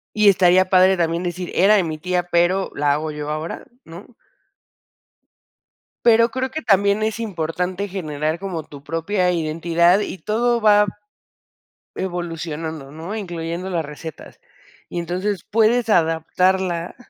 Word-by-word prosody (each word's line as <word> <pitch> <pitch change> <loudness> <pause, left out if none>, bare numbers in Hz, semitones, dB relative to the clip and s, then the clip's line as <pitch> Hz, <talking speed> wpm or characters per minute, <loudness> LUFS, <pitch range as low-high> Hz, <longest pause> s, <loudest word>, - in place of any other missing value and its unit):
y 210 -1 +4
estaría 185 -1 +4
padre 185 0 +5
también 170 0 0
decir: 180 0 -4
"Era 200 +4 +5
de 195 - +3
mi 155 -2 -4
tía, 180 +2 -1
pero 175 +2 +1
la 145 -1 +2
hago 155 +1 -2
yo 150 0 -6
ahora", 155 +2 -5 0.2
¿no? 175 +8 -12 1.9
Pero 230 0 +5
creo 260 +2 -3
que 315 - -5
también 200 +1 +3
es 220 +1 -2
importante 180 -1 -3
generar 155 -3 -3
como 180 -5 -4
tu 140 -1 -13
propia 180 +4 0
identidad 170 +3 +2
y 200 - -4
todo 235 +6 0
va 210 -1 +5 1.1
evolucionando, 165 -5 -5
¿no? 165 +7 -6
Incluyendo 175 -2 -5
las 170 -4 -2
recetas. 150 +1 -10 0.5
Y - - -5
entonces 185 +3 -3
puedes 225 +2 +3
adaptarla 175 0 +1
180 Hz, 135 wpm, -21 LUFS, 165-200 Hz, 1.9 s, padre